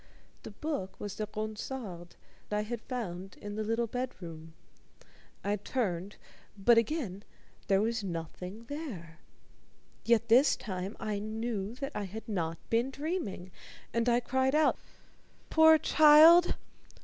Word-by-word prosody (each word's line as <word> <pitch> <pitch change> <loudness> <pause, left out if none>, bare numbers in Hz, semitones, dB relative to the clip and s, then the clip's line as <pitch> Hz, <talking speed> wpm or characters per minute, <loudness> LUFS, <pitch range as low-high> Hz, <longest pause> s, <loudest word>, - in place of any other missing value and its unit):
The - - -8
book 205 -5 -5
was 205 -2 -5
the 215 - -4
Ronsard 215 -4 -6 0.3
I 210 0 0
had 230 +1 -5
found 195 -7 -6
in 205 0 -7
the 215 +1 -2
little 225 +2 0
bedroom. 175 -10 -6 0.9
I 205 +1 0
turned, 200 -3 -3 0.4
but 230 +4 +5
again 230 - -3 0.4
there 195 0 +3
was 230 0 -1
nothing 180 +4 -6
there. 225 - -7 0.8
Yet 230 0 +3
this 250 +6 +5
time 190 -1 -5
I 210 -2 -2
knew 215 0 -4
that 275 +2 -5
I 205 - -3
had 215 +4 -8
not 165 -6 -2
been 235 +3 +2
dreaming, 270 - -4 0.4
and 230 +1 +1
I 240 +1 +3
cried 260 +3 +1
out: 310 0 +3 0.7
"Poor 320 0 +7
child! 310 +3 +7
220 Hz, 130 wpm, -31 LUFS, 195-255 Hz, 0.9 s, Poor